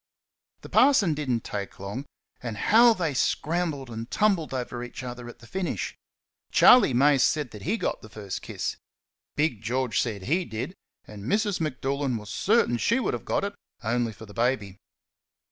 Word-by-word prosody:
The - - -11
parson 215 - +5
did 150 -2 -4
n't 115 -3 0
take 100 -1 -5
long; 100 +9 -5 0.3
and 115 -4 -5
how 230 - +6
they 165 -6 -1
scrambled 150 -1 -1
and 115 +1 -6
tumbled 195 -7 +1
over 125 -2 -4
each 125 +1 -8
other 120 -1 -7
at 120 - -11
the 120 - -16
finish! 185 +8 -3 0.6
Charley 245 - +7
Mace 135 +1 +4
said 150 -6 +1
that 105 - -10
he 205 +8 0
got 190 - -2
the 110 - -12
first 105 -3 -6
kiss; - - -4 0.6
Big 145 -8 0
George 120 -1 0
said 105 -5 -3
HE 170 - +1
did; 125 +8 -5 0.3
and 105 -1 -10
Mrs. 205 - +1
M'Doolan 135 -3 -1
was 105 -1 -8
certain 210 - +2
she 235 - +2
would 255 - -1
have - - -5
got - - 0
it 200 0 -2 0.3
only 120 +1 0
for 110 +1 -11
the 105 - -13
baby. 115 -5 0
130 Hz, 180 wpm, -26 LUFS, 115-165 Hz, 0.6 s, Charley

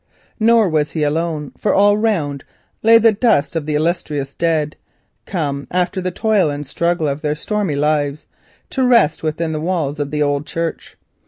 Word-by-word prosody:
Nor 225 -1 +4
was 155 -3 0
he 155 - -1
alone, 150 -1 -1
for 210 - +1
all 205 +1 +5
around 180 -11 -1 0.4
lay 225 +1 +7
the 225 0 +5
dust 215 - +1
of 155 -2 -2
his 155 +4 0
kindred, 150 +2 -2 0.5
come 145 -6 -3
after 180 +1 -1
the 185 - -1
toil 205 -2 +1
and 145 0 -4
struggle 170 +3 -1
of 140 +1 -3
their 150 -1 -1
stormy 205 -2 -2
lives 145 0 0 0.5
to 265 - 0
rest 235 -11 +3
within 160 +1 -2
the 155 -1 -3
walls 160 -4 -2
of 145 -1 -2
that 150 0 -2
old 145 0 -1
church. 165 0 -4
160 Hz, 170 wpm, -18 LUFS, 150-190 Hz, 0.5 s, lay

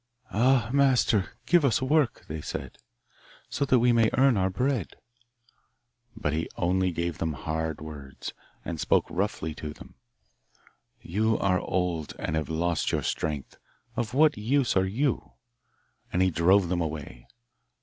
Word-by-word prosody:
'Ah, 120 0 +3
master, 130 -7 +3
give 175 -2 +4
us 135 -5 +3
work,' 135 -1 +1
they 80 0 -5
said, - - -6 0.7
'so 140 - -1
that 130 -2 +4
we 120 +1 +4
may 115 -2 +4
earn 135 -1 +5
our 95 -1 +2
bread.' 125 - -1 1.2
But 75 -9 -1
he 80 +1 -2
only 90 +1 +1
gave 85 -1 -3
them 80 -1 -1
hard 80 +2 -3
words, 70 -3 -8 0.3
and 85 -2 -4
spoke - - +2
roughly 90 -4 -2
to 75 0 -6
them. - - -14 1.1
'You 110 +5 +1
are 90 -2 +2
old, 90 -4 -2
and 75 - -2
have 80 0 -2
lost 85 +1 0
your - - 0
strength; 75 -4 -3 0.4
of 120 0 -2
what 150 +1 +5
use 130 +5 +1
are 95 0 +3
you?' 110 - -1 0.8
And 90 - +2
he 95 - +2
drove 90 +3 +4
them 90 -1 0
away. 75 -6 -5
95 Hz, 150 wpm, -27 LUFS, 80-120 Hz, 1.2 s, earn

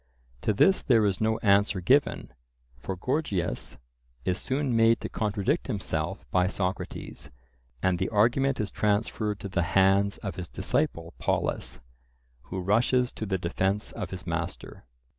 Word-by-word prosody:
To - - +1
this 190 - +4
there 115 -5 +4
is 100 -1 0
no 110 0 +2
answer 100 -1 +4
given, 130 - +2 0.5
for 95 - -4
Gorgias 100 - -2 0.5
is 95 0 0
soon 135 -2 -1
made 115 0 +5
to - - -4
contradict 105 - -1
himself 95 - -3
by 90 0 +3
Socrates, 95 -1 -4 0.5
and 95 -2 +2
the 95 - 0
argument 120 +6 +2
is 105 -2 -2
transferred 105 0 0
to - - -4
the 95 -2 0 0.2
hands 100 +1 +4
of 95 -5 -4
his 90 -3 -6
disciple 85 0 -1
Polus, - - -1 0.6
who 95 - -4
rushes 120 +6 +2
to 110 - -5
the 95 -1 0
defence 95 +3 -1
of - - -5
his - - -7
master. - - -5
100 Hz, 145 wpm, -27 LUFS, 95-115 Hz, 0.6 s, made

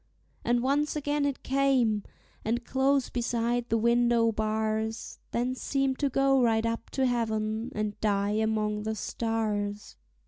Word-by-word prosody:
And 240 0 +1
once 290 +3 +1
again 290 0 0
it 280 - -4
came, 260 -6 +2 0.4
and 235 +2 -1
close 270 0 +1
beside 240 0 -1
the 230 - +2
window 235 0 +3
bars; 220 +1 -2
Then 245 +2 -1
seemed 270 0 -1
to 285 - +1
go 270 0 +3
right 225 -2 +2
up 230 0 -3
to 265 - +3
heaven 220 -1 -1
and 210 -1 -2
die 200 -1 +1
among 215 -1 0
the 220 +1 -2
stars. 210 - -2
230 Hz, 140 wpm, -28 LUFS, 220-260 Hz, 0.4 s, window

